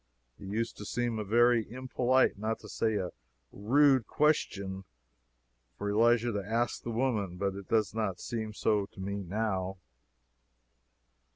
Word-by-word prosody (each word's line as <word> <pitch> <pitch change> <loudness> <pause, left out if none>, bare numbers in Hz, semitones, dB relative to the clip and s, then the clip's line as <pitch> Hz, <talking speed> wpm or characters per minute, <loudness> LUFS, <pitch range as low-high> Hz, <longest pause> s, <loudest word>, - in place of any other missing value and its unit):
It - - -10
used 115 +4 -2
to - - -7
seem 120 0 -1
a - - -2
very 120 +1 +3
impolite, 130 0 +2
not 110 +3 -2
to - - -11
say 110 -1 0
a 95 -3 -2 0.4
rude, 130 +3 +3
question, 100 -11 0 0.9
for 100 0 -2
Elisha 120 +2 +3
to 100 -2 -2
ask 115 +4 -1
the - - -6
woman, 110 -7 -1
but 100 0 -1
it 100 -1 -9
does 110 -3 +2
not 105 -5 -2
seem 110 -2 -4
so 105 -1 +1
to 100 - -17
me 100 +1 -3
now. 95 -1 -2
110 Hz, 150 wpm, -30 LUFS, 100-120 Hz, 0.9 s, very